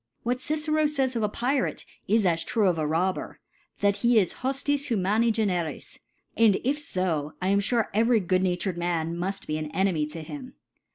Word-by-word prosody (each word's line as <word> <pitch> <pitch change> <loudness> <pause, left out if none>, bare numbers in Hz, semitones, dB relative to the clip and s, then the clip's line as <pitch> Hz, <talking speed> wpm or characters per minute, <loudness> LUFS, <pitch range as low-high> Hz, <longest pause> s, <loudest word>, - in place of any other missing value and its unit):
What 245 +1 0
Gcero 310 +1 +1
fays 265 -4 -1
of 230 - 0
a 210 - +1
Rrate, 255 +5 -1 0.2
is 215 +1 +3
as 165 -2 +2
true 215 +3 +1
of 175 -3 +1
a 155 - 0
Robber, 180 +5 -1 0.4
that 200 0 +3
he 235 +3 +3
is 195 -5 +3
hqfiis 275 +2 -1
bumani 220 +2 +2
generis 185 -7 -2 0.4
i - - -3
and 210 -4 +6
if 280 +4 0
fb, 170 - -2
I 185 - -1
am 200 +1 +3
fare 230 +1 0
every 230 +2 +4
good 185 -1 +1
natured 180 -1 -1
Man 170 -1 -1
mud 190 +3 -4
be 155 0 -2
an 155 -1 -4
Enemy 180 -6 +1
to 160 +1 -7
him. 260 - -9
200 Hz, 190 wpm, -26 LUFS, 175-245 Hz, 0.4 s, and